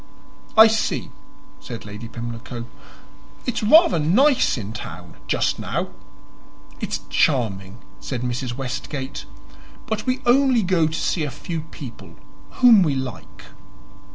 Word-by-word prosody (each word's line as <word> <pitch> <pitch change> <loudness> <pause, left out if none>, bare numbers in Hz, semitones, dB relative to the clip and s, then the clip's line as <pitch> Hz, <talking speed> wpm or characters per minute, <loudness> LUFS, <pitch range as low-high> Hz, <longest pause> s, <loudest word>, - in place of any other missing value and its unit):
"I 220 - +11
see," 220 -1 0 0.5
said 115 -3 -8
Lady 105 +2 -8
Pimlico. 120 +1 -7 0.8
"It's 250 - -2
rather 220 - +6
nice 255 - +3
in 105 -2 -6
town 85 -5 -8
just - - 0
now." - - -2 0.9
"It's - - -3
charming," 105 -8 +1 0.2
said 125 -3 -4
Mrs. 125 0 -3
Westgate. 130 - -5 0.6
"But 220 +2 -3
we 255 0 +1
only 250 -1 +4
go 175 -4 +2
to 155 - -5
see 165 - 0
a 145 - -2
few 160 +4 -5
people 110 - -10 0.3
whom 240 -5 +6
we 150 -6 +2
like." 100 - -7
135 Hz, 125 wpm, -22 LUFS, -, 0.9 s, I